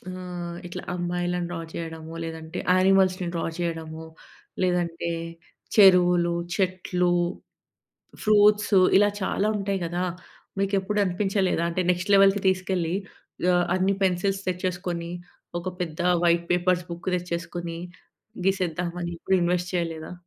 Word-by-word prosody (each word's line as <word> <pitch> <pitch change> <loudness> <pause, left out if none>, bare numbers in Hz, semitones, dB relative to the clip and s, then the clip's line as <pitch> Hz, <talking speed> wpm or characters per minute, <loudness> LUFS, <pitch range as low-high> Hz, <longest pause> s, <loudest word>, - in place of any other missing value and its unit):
ఆహ్, 180 -2 -6
ఇట్లా 175 - -6
అమ్మాయిలను 175 0 -2
డ్రా 175 - -4
చేయడము, 160 -1 -6
లేదంటే 160 +1 -6 0.2
యానిమల్స్‌ని 185 -1 +3
డ్రా 165 - -1
చేయడము, 160 -2 -4 0.6
లేదంటే 170 -2 0 0.7
చెరువులు, 180 -4 +6 0.2
చెట్లు, 180 -1 0 1.1
ఫ్రూట్సు, 210 -1 +5 0.2
ఇలా 205 0 +5
చాలా 200 +2 0
ఉంటాయి 195 -1 -2
గదా. 175 +2 -2 0.6
మీకు 195 0 0
ఎప్పుడు 210 +2 -2
అనిపించలేదా? 190 -1 0
అంటే, 180 +2 0
నెక్స్ట్ 185 +3 -2
లెవెల్‌కి 195 0 +5
తీసుకెళ్ళి. 185 -2 0 0.6
ఆహ్, 175 0 +3
అన్ని 190 +1 +2
పెన్సిల్స్ 195 +2 0
తెచ్చేసుకొని. 180 -2 -3 0.5
ఒక 185 - -4
పెద్ద 160 -2 -5 0.2
వైట్ 170 0 +3
పేపర్స్ 180 0 +2
బుక్ 170 +2 -5
తెచ్చేసుకొని 170 -1 -4 0.7
గీసేద్దామని. 175 -2 -1
ఎప్పుడు 190 +2 +1
ఇన్వెస్ట్ 180 +1 0
చేయలేదా? 165 -1 -3
180 Hz, 110 wpm, -25 LUFS, 170-190 Hz, 1.1 s, చెరువులు